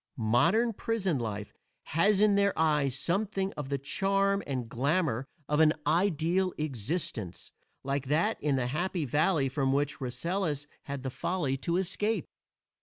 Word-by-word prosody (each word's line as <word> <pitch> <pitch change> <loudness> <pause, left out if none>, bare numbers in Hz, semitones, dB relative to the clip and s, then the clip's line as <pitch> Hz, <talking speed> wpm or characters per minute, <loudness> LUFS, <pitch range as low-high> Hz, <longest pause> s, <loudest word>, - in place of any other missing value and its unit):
Modern 170 - +3
prison 195 - -1
life 105 -3 -4 0.3
has 195 +5 +2
in 210 -1 +5
their 200 0 +2
eyes 150 -4 +2
something 195 +5 -1
of 145 -3 -6
the 140 - 0
charm 195 +8 +1
and 130 -4 -2
glamor 135 +1 0 0.2
of 150 +1 +1
an 155 -1 +6
ideal 175 +2 +1
existence, 140 - -3 0.3
like 140 0 -2
that 170 +10 +1
in 145 -1 +1
the 130 -2 0
Happy 170 +5 -1
Valley 150 +2 +2
from 135 0 0
which 145 +1 0
Rasselas 145 +4 -2 0.2
had 140 -2 -5
the 130 - -3
folly 150 -3 -1
to 170 +5 -1
escape. 205 +4 -1
155 Hz, 145 wpm, -30 LUFS, 135-190 Hz, 0.3 s, an